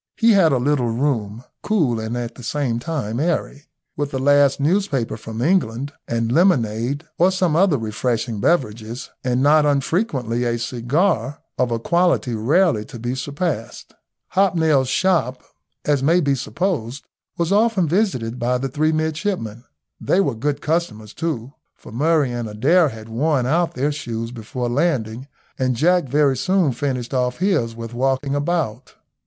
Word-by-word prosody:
He 230 0 +5
had 190 -7 +5
a 135 - +3
little 125 -1 +1
room, 115 -3 -1 0.2
cool 155 - +1
and 110 +2 -3
at 120 -1 -4
the - - -12
same 125 -1 -1
time 125 -5 -3
airy, 150 -3 -2 0.3
with 145 -1 -2
the 135 - -3
last 140 0 +4
newspaper 145 - 0
from 110 +1 -6
England, 140 -5 0
and 115 -1 -1
lemonade, 135 - +2 0.2
or 180 +2 +5
some 185 -4 +1
other 175 -3 +4
refreshing 115 0 -2
beverages, 115 -4 -1
and 125 +1 +1
not 150 +1 +5
unfrequently 140 - 0
a 120 -1 0
cigar 130 - -1 0.2
of 125 -1 +2
a 115 - 0
quality 170 -1 +1
rarely 125 - +2
to 120 - -10
be 120 +2 -3
surpassed. 140 -1 -4 0.4
Hobnail's 160 -8 +2
shop, 130 -4 +1 0.4
as 145 -2 +2
may 165 +6 +4
be 140 -5 +1
supposed, 135 - -3 0.3
was 170 +1 0
often 205 -4 +3
visited 145 - 0
by 125 +1 +1
the 135 +2 -3
three 155 +4 +1
midshipmen. 155 - -2 0.3
They 185 - +1
were 165 -9 +1
good 145 +5 -2
customers 120 -10 -2
too, 140 -6 -4 0.2
for - - -14
Murray 145 +2 +2
and 120 -2 -4
Adair 150 +10 +3
had 110 -2 -10
worn 130 +3 0
out 165 +6 +1
their 140 +4 0
shoes 115 -5 -5
before 120 +2 -5
landing, 125 -3 -1 0.3
and 130 -1 +1
Jack 175 +6 +3
very 140 0 +2
soon 185 0 +2
finished 125 -1 -3
off 125 -1 0
his 160 - 0
with 115 0 -7
walking 135 +2 0
about. 145 -5 -2
135 Hz, 155 wpm, -21 LUFS, 120-160 Hz, 0.4 s, He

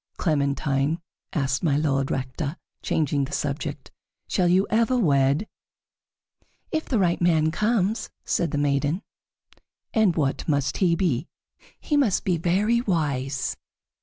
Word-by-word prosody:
"Clementine," 140 0 0 0.3
asked 135 -3 0
My 145 -4 +2
Lord 135 -3 +1
Rector, 135 +5 -3 0.2
changing 145 -2 0
the 140 - -10
subject, 145 +1 -3 0.4
"shall 180 -2 +1
you 185 +3 +4
ever 230 +3 +3
wed?" 145 - +2 1.2
"If 315 0 -1
the 250 - 0
right 180 -4 +1
man 160 -2 +3
comes," 215 +2 0 0.2
said 170 - 0
the 145 - -2
maiden. 145 +6 0 0.9
"And 215 -6 +3
what 140 -4 -1
must 145 -3 0
he 175 -3 +3
be?" 160 -5 0 0.5
"He 295 - 0
must 245 -10 +2
be 180 -3 +1
very 205 +8 +2
wise." 140 - -1
160 Hz, 130 wpm, -25 LUFS, 140-190 Hz, 1.2 s, you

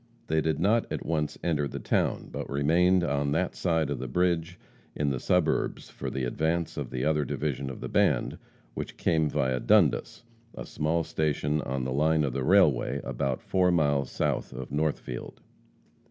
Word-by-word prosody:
They 80 0 +1
did 80 -2 0
not 110 +6 +2
at - - -4
once 75 -2 -1
enter 75 -4 0
the - - -6
town, - - -1
but - - -5
remained 85 +6 +3
on 70 -2 0
that 90 +3 0
side 80 -5 0
of 70 - -2
the 65 - -4
bridge 85 +4 0 0.4
in 75 -2 0
the 65 - -2
suburbs 90 +3 0
for - - -5
the 65 - -3
advance 80 +6 -1
of - - -4
the 65 0 -2
other 75 -1 +2
division 70 0 -3
of 65 - -8
the - - -4
band, - - +1 0.3
which - - -6
came 80 -3 +1
via 65 -2 0
Dundas, 85 - +2 0.3
a - - -6
small 80 +2 -1
station 75 -1 -1
on 65 0 -3
the 65 0 -2
line 80 +2 +2
of 70 -4 -1
the 65 - -2
railway 70 -6 +3
about 65 -2 -2
four 90 -1 +2
miles 70 -6 +2
south - - -2
of 65 0 -7
Northfield. 75 -4 -3
75 Hz, 180 wpm, -28 LUFS, 70-85 Hz, 0.4 s, remained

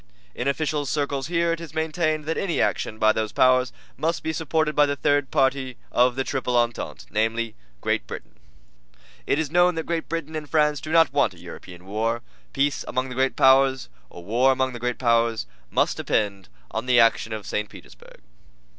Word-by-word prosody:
In 125 - -3
official 145 0 -1
circles 140 -1 -1
here 170 0 +1
it 165 - -5
is 160 -2 -10
maintained 155 -1 -1
that 160 +1 -1
any 175 -4 -1
action 110 - 0
by 110 0 +4
those 110 -1 -2
powers 130 0 +3 0.3
must 165 +2 -1
be 160 - -2
supported 160 -1 0
by 150 0 +5
the 145 - -1
third 145 0 +1
party 130 -3 0 0.2
to 125 +1 +5
the 130 +2 -3
Triple 125 -2 -1
Entente, 120 0 -1
namely, 115 +1 0 0.3
Great - - -1
Britain. - - -8 0.9
It - - +2
is 155 -2 -2
known 175 +1 +4
that 160 -1 -3
Great 165 -1 -3
Britain 160 -2 -4
and 150 -2 -5
France 150 -2 +2
do 155 - -6
not 165 -2 +4
want - - +2
a - - -16
European 90 0 -11
War. 115 +4 -2 0.3
Peace 140 0 0
among 130 +1 -2
the - - -6
great 130 +1 0
powers 135 0 +5 1.9
must - - +1
depend 100 -3 -1 0.2
upon - - -4
the 125 -1 +5
action 115 -1 +3
of 110 -2 -5
St. 105 0 -2
Petersburg. - - -15
135 Hz, 170 wpm, -24 LUFS, 120-155 Hz, 1.9 s, by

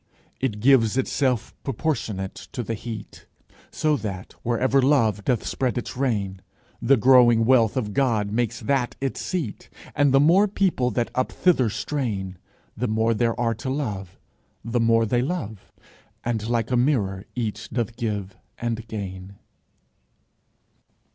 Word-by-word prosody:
It 110 -6 -2
gives 125 -2 +4
itself 130 -2 0
proportionate 110 -8 -2 0.2
to 125 - -3
the 115 - -3
heat: 110 -1 -8 0.4
So 155 0 +1
that, 95 -6 -6
wherever 130 +3 +2
Love 115 -7 +2
doth 120 -2 0
spread 130 -2 -1
its 120 - -4
reign, 105 -8 -1 0.4
The 130 +4 +4
growing 120 -1 +6
wealth 120 -2 +4
of 105 -5 -2
God 110 -6 +1
makes 120 0 -1
that 135 -3 0
its 135 -1 -3
seat. 165 - -4 0.3
And 145 -1 +3
the 135 - +5
more 175 +8 +5
people 185 -11 +1
that 120 +1 -1
up 130 - 0
thither 150 -11 +3
strain, 100 - -3 0.4
The 125 +3 -1
more 110 +1 +2
there 115 +1 0
are 115 -1 +1
to 115 +4 -5
love, 105 -10 -4 0.5
the 120 +1 0
more 115 0 +3
they 120 +3 +1
love, 125 - -4 0.5
And 115 -2 -2
like 120 0 0
a - - +3
mirror 110 -8 +1
each 115 -4 -3
doth 120 -2 -2
give 105 -5 -3 0.2
and 115 -1 -3
gain. 100 -3 -6
120 Hz, 145 wpm, -24 LUFS, 105-130 Hz, 0.5 s, growing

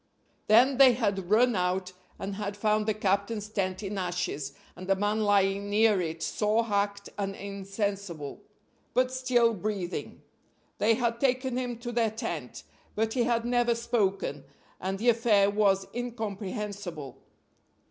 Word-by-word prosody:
Then 245 +5 +5
they 265 -2 +8
had 200 -6 -1
run 235 +3 +4
out, 185 0 -1 0.2
and 195 +1 -4
had 205 -1 -4
found 215 0 +1
the 215 - +2
captain's 205 +1 0
tent 190 -2 -2
in 200 0 -3
ashes, 175 -6 -3 0.2
and 185 +2 -9
a 195 - +5
man 205 +2 0
lying 200 0 +2
near 210 -1 +4
it 165 -1 -4
sore 215 +5 +1
hacked 200 -1 -1
and 195 -1 -2
insensible, 195 -5 -4 0.5
but 255 0 +3
still 255 -3 +2
breathing. 200 -3 -4 0.6
They 225 +2 +4
had 235 -1 -1
taken 260 -1 +1
him 250 -2 -2
to 240 0 -4
their 230 -2 +2
tent, 170 - -5 0.3
but 220 +1 0
he 245 -3 +1
had 235 -1 +1
never 240 -1 +2
spoken, 200 - -1 0.4
and 190 +1 -2
the 235 +5 +2
affair 220 -4 +4
was 200 -2 +2
incomprehensible. 205 - -5
205 Hz, 145 wpm, -28 LUFS, 195-230 Hz, 0.6 s, they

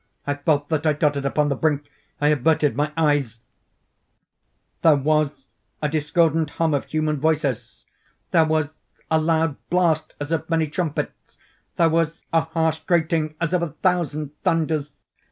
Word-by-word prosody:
I 145 - 0
felt 145 0 0
that 155 -1 0
I 155 - +4
tottered 145 -2 0
upon 145 +1 +1
the 140 - 0
brink—I 145 0 -2
averted 150 -1 +2
my 150 +2 0
eyes— 145 -8 +1 1.4
There 160 -2 +6
was 145 -1 0 0.3
a 150 - 0
discordant 160 +1 +1
hum 165 -2 +2
of 140 - 0
human 155 -1 -1
voices! 150 -5 -1 0.5
There 165 -1 +5
was 155 -2 +1 0.4
a 160 0 +3
loud 160 -2 +1
blast 165 -3 +1
as 145 +2 -5
of 165 - -1
many 160 -1 +1
trumpets! 155 -1 -4 0.4
There 165 -1 +4
was 165 0 -1
a 165 - +5
harsh 160 -1 -1
grating 160 -2 0
as 170 +1 -1
of 180 - +2
a 170 - -1
thousand 155 -3 -1
thunders! 155 -3 0
155 Hz, 150 wpm, -23 LUFS, 145-160 Hz, 1.4 s, There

